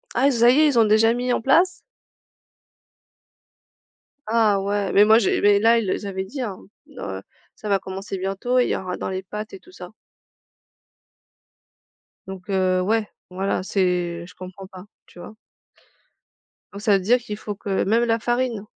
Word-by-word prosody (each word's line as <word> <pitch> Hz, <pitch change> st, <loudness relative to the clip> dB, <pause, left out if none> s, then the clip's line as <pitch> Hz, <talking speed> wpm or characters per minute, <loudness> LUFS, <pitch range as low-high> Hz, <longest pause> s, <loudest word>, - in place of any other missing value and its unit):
Ah, 275 Hz, -, +3 dB
ça 235 Hz, -1 st, +4 dB
y 260 Hz, +5 st, +4 dB
est, 310 Hz, -, +5 dB
ils 255 Hz, -5 st, +2 dB
ont 225 Hz, -, +5 dB
déjà 220 Hz, +2 st, +4 dB
mis 245 Hz, +1 st, -2 dB
en -, -, -1 dB
place? 340 Hz, +9 st, +4 dB, 2.6 s
Ah, 215 Hz, -3 st, +2 dB
ouais, 200 Hz, 0 st, -2 dB
mais 205 Hz, -, +6 dB
moi 220 Hz, +1 st, +6 dB
j'ai 210 Hz, -, +1 dB
mais 205 Hz, 0 st, +4 dB
là 230 Hz, +2 st, +4 dB
ils, 200 Hz, -4 st, -3 dB
heu, -, -, +1 dB
s -, -, -8 dB
avaient 190 Hz, -1 st, -4 dB
dit, 265 Hz, +8 st, -7 dB
hein, 205 Hz, -6 st, -5 dB, 0.4 s
heu, -, -, -6 dB, 0.3 s
ça 215 Hz, -, -7 dB
va 195 Hz, -1 st, +2 dB
commencer 195 Hz, +1 st, -7 dB
bientôt, 195 Hz, +7 st, -1 dB
il 245 Hz, -, +2 dB
y -, -, 0 dB
aura 180 Hz, -1 st, -5 dB
dans -, -, -4 dB
les 190 Hz, 0 st, -4 dB
pâtes 210 Hz, +3 st, -7 dB
et 390 Hz, -, -9 dB
tout 365 Hz, -, -20 dB
ça -, -, -11 dB, 2.4 s
donc 190 Hz, 0 st, -10 dB
heu, 185 Hz, -1 st, +1 dB
ouais, 215 Hz, +2 st, 0 dB, 0.2 s
voilà, 190 Hz, 0 st, -2 dB
c'est 180 Hz, -3 st, -1 dB
je 180 Hz, -, -15 dB
comprends 185 Hz, +1 st, -10 dB
pas, 185 Hz, 0 st, -12 dB, 0.2 s
tu -, -, -16 dB
vois. 195 Hz, -, -10 dB, 1.4 s
Donc 200 Hz, -, -8 dB
ça 210 Hz, -1 st, +2 dB
veut 190 Hz, -, -6 dB
dire 235 Hz, +6 st, +4 dB
qu'il 210 Hz, -3 st, -7 dB
faut 210 Hz, -1 st, -6 dB
que 195 Hz, -1 st, -2 dB
même 225 Hz, +4 st, +2 dB
la 230 Hz, -1 st, +1 dB
farine, 240 Hz, -2 st, -1 dB
205 Hz, 180 wpm, -22 LUFS, 190-230 Hz, 2.6 s, mais